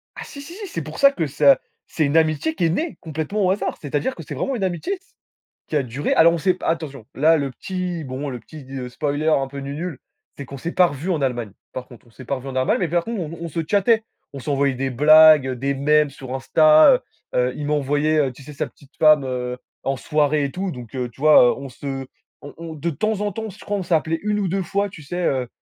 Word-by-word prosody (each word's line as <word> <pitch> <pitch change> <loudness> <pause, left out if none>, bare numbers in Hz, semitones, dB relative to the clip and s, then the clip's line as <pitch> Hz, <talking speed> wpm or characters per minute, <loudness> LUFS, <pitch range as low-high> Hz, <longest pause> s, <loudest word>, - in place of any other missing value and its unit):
Ah, - - -7
si, 280 - -10
si, 335 +5 -10
si, 405 0 -7
c'est - - -4
pour - - -8
ça 275 -1 +7
que 165 - -2
ça, 140 -1 +4 0.3
c'est 155 - 0
une 145 +3 +2
amitié 160 0 +1
qui 170 - 0
est - - +3
née 310 - -2
complètement 160 +6 -2
au 185 - +3
hasard. 200 - -2
C'est-à-dire 150 - -2
que - - -9
c'est - - -7
vraiment 270 - -2
une 200 - -3
amitié 185 - -2
s 385 0 -11 0.5
qui 155 - -2
a 140 - +3
duré 130 +4 -2
alors 170 +1 +6
on 170 - -1
sait 180 +3 +2
p - - -10
attention, 150 -7 -2
là 160 +4 +4
le 140 -2 -2
petit, 180 +3 -4
bon, 135 +1 -5
le 125 -2 -6
petit 145 +3 -12 0.2
spoiler 145 +4 -2
un 135 -3 +2
peu 140 +1 -8
nu-nul, 145 +2 -5 0.4
c'est 140 - -6
qu'on 140 - -8
s'est 165 +6 -5
pas 180 - +5
revus 155 +5 -4
en 160 -5 0
Allemagne, 120 -5 -1 0.2
par 125 0 -5
contre. 120 -1 -16
On - - -21
s'est 120 +4 -12
pas 140 - -2
revus 130 +1 -8
en 130 - -6
Allemagne, 130 - +2
mais 175 - 0
par 170 +1 0
contre 230 -4 -4
on 165 +1 -6
on - - -3
se 165 +2 -3
chattait. 220 +2 +3 0.3
On 140 - -7
s'envoyait 140 -1 0
des 135 +1 -2
blagues, 155 0 +7
des 135 +3 -2
mèmes 150 +2 +3
sur 130 -2 -8
Insta, 155 - +6
heu 250 - 0 0.4
heu, 125 0 +2
il 145 - -4
m'a 150 - +1
envoyé, 145 +2 +1
heu, 135 -4 +2
tu 135 - -14
sais 150 - -10
sa - - -2
petite 140 +1 -20
femme 155 -4 +5 0.6
en 135 0 -1
soirée 150 +2 +1
et 140 - -2
tout. 190 +3 -3
Donc 125 -3 -9
heu, 125 -1 -2
tu 130 - -20
vois? 150 -5 +6
On 140 0 -7
se 135 +1 -6 0.3
on 145 - -11
on 165 -1 -8
de 155 +3 -3
temps 215 +5 -1
en 205 0 0
temps, 220 +1 -5
je 200 - -15
crois, 205 - -2
on 195 - -2
s'appelait 165 -1 0
1 210 0 0
ou 190 - 0
2 190 +2 -1
fois, 200 +3 -1
tu 160 -5 -12
sais, 175 +5 -4
heu, 130 -3 0
150 Hz, 260 wpm, -22 LUFS, 135-175 Hz, 0.6 s, ça